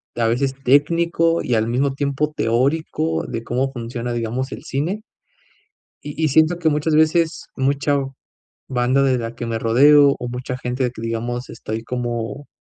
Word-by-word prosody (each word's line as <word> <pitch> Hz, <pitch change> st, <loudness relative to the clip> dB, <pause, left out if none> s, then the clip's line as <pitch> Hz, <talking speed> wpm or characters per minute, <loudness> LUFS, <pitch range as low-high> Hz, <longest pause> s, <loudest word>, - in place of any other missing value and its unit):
a 115 Hz, -1 st, +1 dB
veces 130 Hz, +3 st, 0 dB
técnico 165 Hz, +4 st, +3 dB
y 120 Hz, -, 0 dB
al 110 Hz, +1 st, +1 dB
mismo 135 Hz, +3 st, +1 dB
tiempo 145 Hz, +2 st, -1 dB
teórico 120 Hz, -, 0 dB
de 115 Hz, -2 st, -4 dB
cómo 130 Hz, +4 st, -1 dB
funciona, 120 Hz, 0 st, -4 dB
digamos, 120 Hz, +3 st, -3 dB
el -, -, -9 dB
cine. 170 Hz, +11 st, -2 dB, 1.0 s
Y 150 Hz, +2 st, -4 dB
y -, -, +4 dB
siento 160 Hz, +5 st, +3 dB
que 160 Hz, -, +2 dB
muchas 150 Hz, +1 st, +1 dB
veces, 160 Hz, +1 st, +2 dB
mucha 140 Hz, +1 st, +1 dB, 0.7 s
banda 130 Hz, +1 st, +2 dB
de 130 Hz, -2 st, +2 dB
la 115 Hz, 0 st, -5 dB
que 120 Hz, -1 st, -5 dB
me 115 Hz, -1 st, -2 dB
rodeo, 140 Hz, +5 st, +6 dB
o 125 Hz, -, -5 dB
mucha 125 Hz, +1 st, -5 dB
gente 125 Hz, +1 st, -2 dB
de 125 Hz, -, 0 dB
que, 110 Hz, -, -9 dB
digamos, 120 Hz, +2 st, -3 dB
estoy 110 Hz, +1 st, -5 dB
como 120 Hz, +2 st, -4 dB
130 Hz, 165 wpm, -21 LUFS, 120-145 Hz, 1.0 s, rodeo